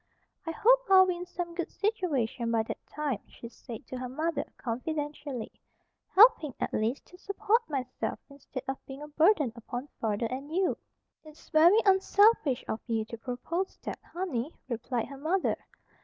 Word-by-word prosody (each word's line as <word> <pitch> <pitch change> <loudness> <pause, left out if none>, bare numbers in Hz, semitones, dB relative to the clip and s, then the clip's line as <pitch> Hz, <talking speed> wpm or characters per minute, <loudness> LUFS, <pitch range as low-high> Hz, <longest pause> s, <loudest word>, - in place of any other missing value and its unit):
"I - - 0
hope - - +5
I'll 380 -1 +8
be 365 -1 0
in 355 +1 -7
some 350 -1 -5
good 345 -1 -3
situation 290 - -1
by 225 -1 +2
that - - -6
time," 290 -7 -2
she 235 - -10
said 240 +1 -10
to 255 - -6
her 255 -1 -4
mother, 310 +2 -1
confidentially, 285 0 -4 0.6
"helping, 390 - +7
at - - -2
least, 225 +5 -1
to 360 - -17
support 425 +3 +1
myself 255 -4 -3
instead 280 -2 -8
of 270 0 -4
being 270 +2 -8
a - - -7
burden 310 - +3
upon 245 +4 -6
father 220 0 0
and 265 +5 -5
you." 365 +2 +1 0.5
"It's 310 -1 -16
very 345 +7 +6
unselfish 385 - +4
of 220 - -2
you 225 -2 0
to 230 - -8
propose 270 +10 -3
that, - - -5
honey," 320 -7 -3 0.2
replied 240 -1 -2
her 275 - -10
mother. 350 +6 +1
295 Hz, 165 wpm, -29 LUFS, 245-360 Hz, 0.6 s, I'll